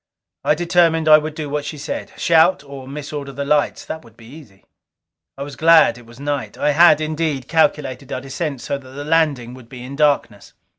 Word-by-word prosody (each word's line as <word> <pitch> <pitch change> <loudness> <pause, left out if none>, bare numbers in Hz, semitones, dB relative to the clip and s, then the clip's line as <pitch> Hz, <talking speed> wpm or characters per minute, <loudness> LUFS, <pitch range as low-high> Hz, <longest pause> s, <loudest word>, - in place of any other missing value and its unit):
I 150 - +2
determined 165 -1 +2
I 155 0 +8
would 155 0 -6
do 155 -2 -5
what 145 +1 -3
she 150 +1 -6
said. 140 - -6
Shout, 165 +1 +3
or 140 -2 -10
mis 145 +2 -8
order 140 -2 -5
the 140 +1 -5
lights. 150 0 0
That 160 - -7
would 115 -2 -19
be 115 - -15
easy. 120 -7 -15 0.7
I 140 - -5
was 140 -1 -9
glad 165 +3 +5
it 120 -1 -15
was 120 +2 -15
night. 145 -1 -4
I 150 - +1
had, 155 0 +6
indeed, 155 -4 -2
calculated 150 -5 0
our 130 - -3
descent 140 0 -5
so 140 +3 -3
that 130 -1 -15
the 145 +1 -7
landing 150 -7 +1
would 125 -2 -14
be 125 -2 -10
in 135 +2 -8
darkness. 140 -8 0
145 Hz, 210 wpm, -19 LUFS, 130-155 Hz, 0.7 s, I